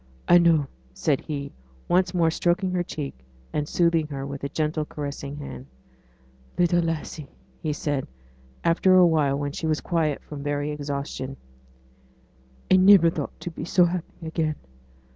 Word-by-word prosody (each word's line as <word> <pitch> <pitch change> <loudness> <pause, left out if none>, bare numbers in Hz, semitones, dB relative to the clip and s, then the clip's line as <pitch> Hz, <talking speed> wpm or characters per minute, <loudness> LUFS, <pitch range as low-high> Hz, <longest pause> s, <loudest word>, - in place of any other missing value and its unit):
'I 175 - +7
know,' 165 -4 +4 0.3
said 145 -4 +1
he, 140 -3 -5 0.4
once 180 0 +3
more 170 -3 +2
stroking 180 +3 +1
her 180 -1 0
cheek, 150 -5 -5 0.4
and 150 -1 -1
soothing 170 -3 +2
her 135 -2 -5
with 140 0 -6
gentle, 155 0 -1
caressing 145 -1 -6
hand. 65 - -8 0.9
'Little 175 0 +3
lassie!' 160 -3 -4 0.3
he 155 - -1
said, 145 -2 -2 0.6
after 180 +2 +4
a 185 -1 +8
while 150 -5 +2
when 145 0 -2
she 160 - -4
was 155 -1 +1
quiet 160 -4 -1
from 145 -2 -8
very 145 +1 -1
exhaustion, 140 -2 -4 1.3
'I 185 - +8
niver 185 -3 +7
thought - - -5
to 175 - -5
be - - -7
so 180 +1 +4
happy 175 -1 -4
again. 160 -1 -1
155 Hz, 150 wpm, -25 LUFS, 145-175 Hz, 1.3 s, a